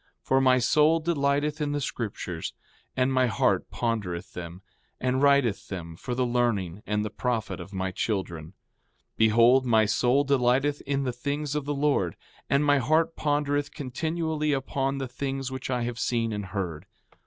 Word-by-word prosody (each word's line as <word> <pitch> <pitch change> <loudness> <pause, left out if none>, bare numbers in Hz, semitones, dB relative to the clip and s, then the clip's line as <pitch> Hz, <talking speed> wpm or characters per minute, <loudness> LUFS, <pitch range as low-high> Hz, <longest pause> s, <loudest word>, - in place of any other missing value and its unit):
For 135 0 +2
my 130 -1 +5
soul 150 +6 +4
delighteth 150 -1 0
in 145 -1 0
the 145 - 0
scriptures, 100 - -4 0.4
and 130 +1 +2
my 130 -1 +3
heart 110 - +1
pondereth 105 -8 -3
them, 90 +1 -8 0.4
and 130 +1 0
writeth 140 -7 +3
them 85 -4 -6
for 125 +8 -5
the 125 0 +1
learning 110 -7 0
and 105 0 0
the 105 - -4
profit 115 -1 -2
of 100 - -9
my 95 -1 -2
children. 95 -6 -2
4:16 80 - -15 0.6
Behold, 115 +4 +5
my 110 -2 +4
soul 125 +6 +2
delighteth 135 +1 +2
in 140 0 0
the 125 -2 -2
things 145 +4 -3
of 150 -2 -2
the 145 0 -2
Lord; 140 - +1 0.3
and 140 +2 +3
my 145 -1 +4
heart 160 +5 +2
pondereth 145 -1 0
continually 155 +2 -1
upon 135 0 -1
the 135 -1 -3
things 135 +1 -4
which 130 0 -5
I 125 -2 0
have 120 0 -4
seen 115 -2 0
and 105 -1 -4
heard. 90 -5 -4
130 Hz, 170 wpm, -27 LUFS, 110-140 Hz, 0.6 s, my